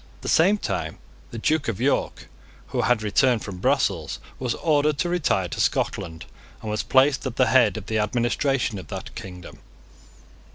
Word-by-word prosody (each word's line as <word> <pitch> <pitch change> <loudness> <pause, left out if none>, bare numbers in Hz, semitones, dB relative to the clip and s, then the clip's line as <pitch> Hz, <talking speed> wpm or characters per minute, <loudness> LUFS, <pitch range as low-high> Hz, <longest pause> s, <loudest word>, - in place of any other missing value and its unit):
At - - -26
the - - -5
same 190 +6 +4
time - - -3 0.3
the 115 - -8
Duke 155 +6 0
of 110 -3 -2
York, 135 +3 0 0.4
who - - -1
had 120 -3 +2
returned 120 +2 +2
from 100 -3 -7
Brussels, 100 - 0 0.2
was 125 -3 -1
ordered 150 -2 +1
to 175 - 0
retire 145 - +1
to - - -6
Scotland, 80 -1 -1 0.4
and 110 - -3
was 105 - -1
placed 135 +1 +3
at 125 - -5
the 130 - +4
head 115 -8 +4
of 105 - -7
the 110 0 -1
administration 120 +1 0
of 90 - -10
that - - -7
kingdom. 90 -2 -9
120 Hz, 175 wpm, -24 LUFS, 105-140 Hz, 0.4 s, same